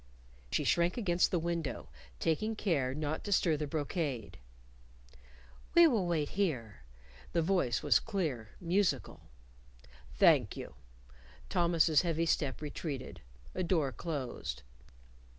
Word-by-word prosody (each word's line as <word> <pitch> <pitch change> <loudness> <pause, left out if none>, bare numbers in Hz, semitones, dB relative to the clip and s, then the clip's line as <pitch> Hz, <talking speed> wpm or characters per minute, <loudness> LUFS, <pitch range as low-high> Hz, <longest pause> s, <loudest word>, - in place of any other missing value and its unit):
She - - +1
shrank 170 +4 +2
against 180 -6 +2
the 180 - +1
window, 170 -2 -3 0.3
taking 215 +8 0
care 140 -11 0
not 155 +1 -3
to 205 - -5
stir 170 -4 +3
the 150 0 -3
brocade. 145 - -3 1.4
"We 340 0 +9
will 225 - +2
wait 155 -4 0
here," 125 - -2 0.5
the 170 -2 +2
voice 170 -10 +1
was - - +5
clear, 155 - -3
musical. 185 +3 0 0.9
"Thank - - +4
you." - - -7 0.8
Thomas's 165 -3 +3
heavy 165 -1 0
step 150 -3 0
retreated. 145 -2 -5 0.3
A - - -2
door 165 -6 +1
closed. 130 - -5
165 Hz, 115 wpm, -32 LUFS, 145-180 Hz, 1.4 s, We